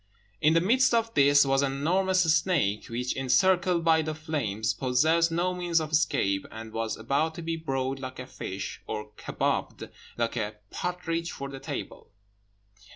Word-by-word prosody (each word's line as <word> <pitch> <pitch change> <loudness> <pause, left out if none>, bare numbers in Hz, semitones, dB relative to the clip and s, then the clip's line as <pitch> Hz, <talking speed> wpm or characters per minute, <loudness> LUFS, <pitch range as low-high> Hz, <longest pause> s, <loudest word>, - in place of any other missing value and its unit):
In 155 +2 +4
the 165 - +5
midst 245 +6 +3
of 230 0 0
this 140 0 +5
was 135 0 +2
an 135 -1 0
enormous 185 +6 +2
snake, 145 - 0
which, 125 +2 -3
encircled 175 +7 +2
by 160 -1 +5
the 155 0 -3
flames, 125 - -2
possessed 160 +6 +2
no 175 +2 0
means 175 -2 +1
of 155 -1 -4
escape, 100 -10 +1
and 110 0 -9
was 115 -1 -2
about 140 +8 0
to 170 - -7
be 165 0 -2
broiled 135 -4 -2
like 130 -1 -7
a 125 - -6
fish, 100 -6 -6
or 105 0 -5
kabobed - - -2 0.3
like 115 0 -1
a 110 -1 -2 0.2
partridge 170 -1 -3
for 140 0 -6
the 135 -1 -8
table. - - -7
150 Hz, 165 wpm, -27 LUFS, 125-170 Hz, 0.3 s, the